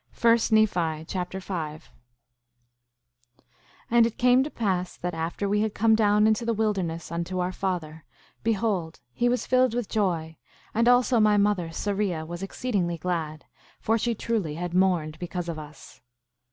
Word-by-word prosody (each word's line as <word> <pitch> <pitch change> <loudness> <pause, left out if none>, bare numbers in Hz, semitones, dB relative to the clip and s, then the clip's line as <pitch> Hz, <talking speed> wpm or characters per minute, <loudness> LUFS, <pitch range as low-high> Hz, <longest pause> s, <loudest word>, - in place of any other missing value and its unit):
1 230 -1 +6
Nephi 175 -8 +2
Chapter 180 +1 -4
5 160 -5 -6 1.5
5:1 - - -31 0.5
And 235 -1 +5
it 230 - -8
came 250 +1 +5
to 290 - -4
pass 185 -8 -2
that 180 0 -4
after 165 +5 -3
we 210 +1 +1
had 215 -1 -1
come 220 +2 +4
down 210 -1 +4
into 220 +1 +2
the 230 -1 0
wilderness 190 -7 -2
unto 170 +2 -3
our 180 0 0
father, 170 -5 -4 0.4
behold, 205 -7 -1
he 245 - +1
was 245 +1 0
filled 255 -2 +3
with 240 -4 -2
joy, 170 -7 -1 0.4
and 230 +2 +2
also 245 0 +4
my 210 -1 +4
mother, 200 -4 +1
Sariah, 195 -2 -2
was 170 +2 -7
exceedingly 195 -4 -2
glad, 160 -3 -3 0.3
for 225 - +1
she 230 +1 0
truly 205 -9 -2
had 175 +1 -4
mourned 175 -4 +1
because 175 0 -4
of 165 -2 -4
us. 150 0 -12
190 Hz, 160 wpm, -26 LUFS, 170-220 Hz, 1.5 s, 1